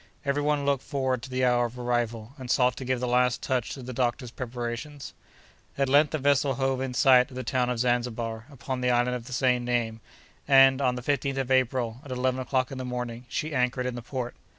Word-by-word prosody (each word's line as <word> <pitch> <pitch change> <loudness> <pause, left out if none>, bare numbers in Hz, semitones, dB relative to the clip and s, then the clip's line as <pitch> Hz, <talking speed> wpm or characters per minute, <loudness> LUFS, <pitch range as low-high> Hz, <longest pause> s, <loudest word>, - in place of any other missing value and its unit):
Every 140 +1 +1
one 145 -1 0
looked 140 -2 +1
forward 130 -3 -1
to 130 - -9
the 130 0 0
hour 120 -1 +3
of 120 +2 -13
arrival, 120 -1 -2
and 130 -2 -8
sought 125 -1 +3
to - - -5
give 130 0 0
the 125 - -2
last 125 0 +2
touch 125 -3 -1
to 135 - -9
the 130 +1 -6
doctor's 125 0 -1
preparations. 125 +3 -6 0.6
At 135 -1 +1
length 145 +2 +5
the 155 - -2
vessel 140 -1 +2
hove 135 0 0
in 130 -1 -3
sight 130 -2 +5
of 130 - -12
the 130 - -4
town 125 +1 0
of 125 - -1
Zanzibar, 120 -1 -1
upon 130 -2 -5
the 125 - +1
island 125 0 +2
of 120 -2 -6
the 130 - -7
same 125 -1 +2
name, 120 -2 -1 0.5
and, 135 -1 +6
on 125 -2 +2
the 125 - -6
15th 140 0 -1
of 135 -1 -2
April, 125 -2 +1
at 145 - -12
11 130 0 0
o'clock 130 +1 -1
in 135 - -6
the - - -3
morning, 125 -1 -5
she 155 +4 -3
anchored 125 0 0
in 125 - -2
the 120 - -6
port. 125 0 -4
125 Hz, 230 wpm, -27 LUFS, 120-135 Hz, 0.6 s, and